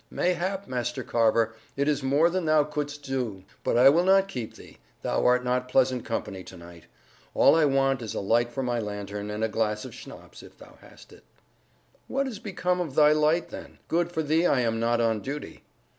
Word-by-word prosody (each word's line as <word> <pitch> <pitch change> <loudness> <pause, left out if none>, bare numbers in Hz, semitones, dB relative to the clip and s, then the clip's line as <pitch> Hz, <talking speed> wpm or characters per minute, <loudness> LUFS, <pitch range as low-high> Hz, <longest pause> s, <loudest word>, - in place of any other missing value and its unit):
"Mayhap, 185 +2 -1
Master 120 -1 -3
Carver, 115 -1 +2 0.2
it 140 +1 0
is 145 -1 +1
more 145 +6 +3
than 185 -1 -1
thou 155 -1 +4
couldst 145 -1 -5
do. 125 -9 -3 0.2
But - - +1
I 125 +2 +7
will 165 +5 +3
not 195 +1 +4
keep 125 - -6
thee; - - -15 0.2
thou - - 0
art 125 0 +3
not 125 0 -1
pleasant 125 -1 +2
company 100 -4 -4
to 95 - -12
night. 85 -1 -14 0.5
All - - +6
I 160 -2 +4
want 135 -2 +1
is 110 - -6
a - - -1
light 120 +4 +1
for 135 +3 -3
my 120 -1 -1
lantern, 105 -1 -5
and 105 +1 -3
a - - +2
glass 105 -1 -2
of - - -9
schnapps, - - -12
if - - -16
thou - - -16
hast - - -17
it." - - -18 0.8
"What 275 +1 -1
is 225 -6 -6
become 180 -3 -2
of 155 -6 -5
thy 150 -1 +6
light, 155 +2 +2
then? - - -10
Good 170 +1 0
for 160 -2 -2
thee 160 +4 +2
I 130 - +2
am 115 -1 0
not 115 +1 +1
on 115 -2 +1
duty." 145 +5 -7
130 Hz, 210 wpm, -26 LUFS, 115-160 Hz, 0.8 s, I